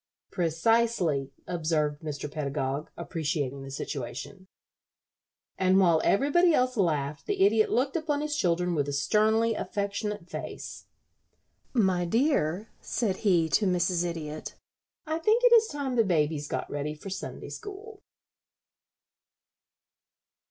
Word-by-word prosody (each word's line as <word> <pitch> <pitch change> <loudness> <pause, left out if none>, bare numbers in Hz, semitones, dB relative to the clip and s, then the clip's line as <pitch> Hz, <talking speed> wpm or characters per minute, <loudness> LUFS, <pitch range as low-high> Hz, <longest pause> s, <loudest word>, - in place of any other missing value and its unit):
"Precisely," 170 -4 +1
observed 155 -3 -1
Mr. 150 -2 -4
Pedagog, 140 -1 -3
appreciating 155 -5 -2
the 135 - -8
situation. 135 +8 -6 1.1
And 185 0 +4
while 170 -4 +4
everybody 310 - +4
else 255 0 +1
laughed 150 -7 -1
the 190 - +3
Idiot 215 +1 +3
looked 265 +4 +1
upon 305 -3 0
his 300 0 -2
children 180 - +1
with 145 -3 0
a - - -3
sternly 220 +9 +2
affectionate 205 -2 -3
face. - - -7 0.9
"My 190 -7 +2
dear," 220 - +1
said 205 -6 -1
he 175 -6 +3
to 205 +5 +2
Mrs. 180 -1 +1
Idiot, 155 -3 -5 0.5
"I 315 +1 -2
think 435 +8 +2
it - - +7
is 450 -1 +6
time 280 - -3
the 230 - +5
babies 155 -5 0
got - - -3
ready 145 +1 -3
for 190 +6 -9
Sunday 190 - -6
school." 420 0 -9
185 Hz, 125 wpm, -28 LUFS, 155-230 Hz, 1.1 s, it